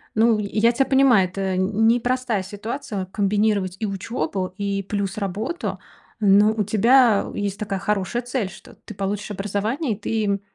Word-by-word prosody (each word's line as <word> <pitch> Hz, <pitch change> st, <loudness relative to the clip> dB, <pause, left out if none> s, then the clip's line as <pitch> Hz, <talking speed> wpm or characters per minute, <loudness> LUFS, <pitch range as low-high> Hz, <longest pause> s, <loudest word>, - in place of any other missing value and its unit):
Ну, 225 Hz, 0 st, +4 dB
й 210 Hz, -, -2 dB, 0.2 s
я 230 Hz, +2 st, +5 dB
тебя 265 Hz, +3 st, +1 dB
понимаю, 265 Hz, -8 st, +4 dB
это 190 Hz, 0 st, -2 dB
ни 220 Hz, +5 st, +3 dB
непростая 245 Hz, -4 st, -1 dB
ситуация- 205 Hz, 0 st, -5 dB
комбинировать 205 Hz, -2 st, +1 dB
и 220 Hz, -, -1 dB
учебу, 195 Hz, -2 st, -3 dB
и 200 Hz, -1 st, -2 dB
плюс 200 Hz, +1 st, -3 dB
работу. 215 Hz, -, -3 dB, 0.4 s
Но 205 Hz, 0 st, +5 dB
у 220 Hz, -1 st, -1 dB
тебя 220 Hz, +2 st, +4 dB
есть 200 Hz, -1 st, -3 dB
такая 200 Hz, -2 st, -3 dB
хорошая 210 Hz, +3 st, -1 dB
цель, 245 Hz, -6 st, -2 dB
что 190 Hz, -, -14 dB
ты -, -, -8 dB
получишь 200 Hz, +2 st, -3 dB
образование, 210 Hz, -, -2 dB
и 200 Hz, -, -9 dB
ты 220 Hz, 0 st, -1 dB
м 200 Hz, -1 st, 0 dB
210 Hz, 165 wpm, -22 LUFS, 195-230 Hz, 0.4 s, я